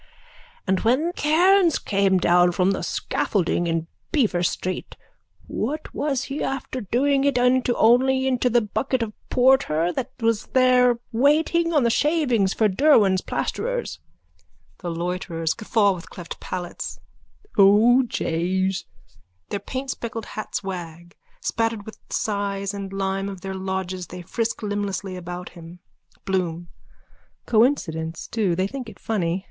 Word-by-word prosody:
_ -, -, -29 dB, 0.6 s
And 190 Hz, -1 st, +1 dB
when 275 Hz, +10 st, +1 dB
Cairns 350 Hz, +3 st, +4 dB
came 195 Hz, -2 st, +2 dB
down 175 Hz, 0 st, +4 dB
from 185 Hz, +2 st, +2 dB
the 195 Hz, -, -2 dB
scaffolding 175 Hz, -3 st, -1 dB
in 165 Hz, -1 st, -1 dB, 0.3 s
Beaver 225 Hz, -, +2 dB
street 185 Hz, +1 st, -3 dB, 0.5 s
what 295 Hz, +8 st, -4 dB
was 280 Hz, -3 st, -1 dB
he 285 Hz, +1 st, -5 dB
after 260 Hz, -1 st, -3 dB
doing 270 Hz, +7 st, +1 dB
it 280 Hz, -2 st, +2 dB
into 250 Hz, 0 st, +3 dB
only 260 Hz, +3 st, +4 dB
into 255 Hz, -1 st, +1 dB
the 240 Hz, 0 st, +3 dB
bucket 240 Hz, +4 st, -1 dB
of 215 Hz, -2 st, -5 dB, 0.2 s
porter 245 Hz, -, +3 dB
that 260 Hz, -1 st, -3 dB
was 230 Hz, -2 st, 0 dB
there 250 Hz, -2 st, +5 dB
waiting 310 Hz, +7 st, +2 dB
on 295 Hz, -5 st, +3 dB
the 235 Hz, -, +3 dB
shavings 255 Hz, -, +2 dB
for 220 Hz, -, +2 dB
Derwan's 200 Hz, -4 st, +4 dB
plasterers. -, -, -3 dB, 0.8 s
THE 175 Hz, -, -5 dB
LOITERERS: 170 Hz, -1 st, -2 dB
(Guffaw 215 Hz, -2 st, +2 dB
with 175 Hz, -2 st, -9 dB
cleft 175 Hz, -2 st, -9 dB
palates.) 175 Hz, -1 st, -5 dB, 0.6 s
O 215 Hz, +6 st, +6 dB
jays! 185 Hz, -4 st, -1 dB, 0.6 s
(Their 200 Hz, -, -2 dB
paintspeckled 250 Hz, -4 st, -5 dB
hats 215 Hz, -, -5 dB
wag. 175 Hz, -2 st, -7 dB, 0.3 s
Spattered 225 Hz, -2 st, -1 dB
with 220 Hz, -, -10 dB
size 200 Hz, -1 st, -2 dB
and 200 Hz, -1 st, -6 dB
lime 195 Hz, 0 st, -2 dB
of 190 Hz, -2 st, -8 dB
their 190 Hz, 0 st, -5 dB
lodges 190 Hz, -1 st, -4 dB
they 180 Hz, 0 st, -8 dB
frisk 230 Hz, +5 st, -3 dB
limblessly 200 Hz, -2 st, -3 dB
about 180 Hz, 0 st, -6 dB
him.) 170 Hz, +1 st, -12 dB, 0.5 s
BLOOM: 175 Hz, -3 st, -2 dB, 0.8 s
Coincidence 170 Hz, -, +1 dB
too. 205 Hz, -7 st, 0 dB
They 185 Hz, +2 st, +1 dB
think 250 Hz, +3 st, -6 dB
it 200 Hz, -, -13 dB
funny. 180 Hz, -5 st, -1 dB
205 Hz, 135 wpm, -23 LUFS, 185-255 Hz, 0.8 s, O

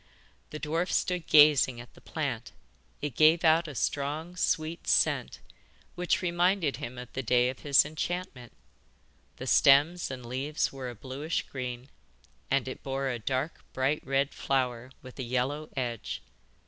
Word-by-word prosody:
The 150 Hz, -, -7 dB
dwarf 165 Hz, +4 st, -1 dB
stood 180 Hz, -3 st, 0 dB
gazing 145 Hz, -5 st, +6 dB
at 120 Hz, -, -12 dB
the -, -, -18 dB
plant. -, -, -4 dB, 0.5 s
It 145 Hz, -3 st, -2 dB
gave 160 Hz, +6 st, +5 dB
out 165 Hz, +1 st, +4 dB
a 150 Hz, -, -8 dB
strong 150 Hz, +7 st, -2 dB
sweet 165 Hz, -2 st, -1 dB
scent, -, -, +1 dB, 0.5 s
which 180 Hz, +1 st, 0 dB
reminded 175 Hz, -2 st, +1 dB
him 120 Hz, +1 st, -7 dB
of 125 Hz, -1 st, -9 dB
the 130 Hz, -, -2 dB
day 125 Hz, 0 st, +3 dB
of 130 Hz, -, -6 dB
his 140 Hz, -2 st, +4 dB
enchantment. 155 Hz, -5 st, -4 dB, 0.8 s
The -, -, -7 dB
stems 150 Hz, +6 st, +4 dB
and 130 Hz, -2 st, -7 dB
leaves 135 Hz, +6 st, -2 dB
were 130 Hz, -2 st, -5 dB
a 120 Hz, -, -8 dB
bluish 135 Hz, +8 st, -3 dB
green, 125 Hz, 0 st, -6 dB, 0.6 s
and 135 Hz, -1 st, +1 dB
it 130 Hz, -, -6 dB
bore 135 Hz, 0 st, -2 dB
a 120 Hz, -2 st, -3 dB
dark, 130 Hz, +7 st, -3 dB
bright 135 Hz, +3 st, 0 dB
red 135 Hz, +1 st, 0 dB
flower 125 Hz, -2 st, -1 dB
with 130 Hz, +1 st, -12 dB
a -, -, -2 dB
yellow 130 Hz, +5 st, -2 dB
edge. 120 Hz, -4 st, -4 dB
140 Hz, 155 wpm, -29 LUFS, 130-155 Hz, 0.8 s, gazing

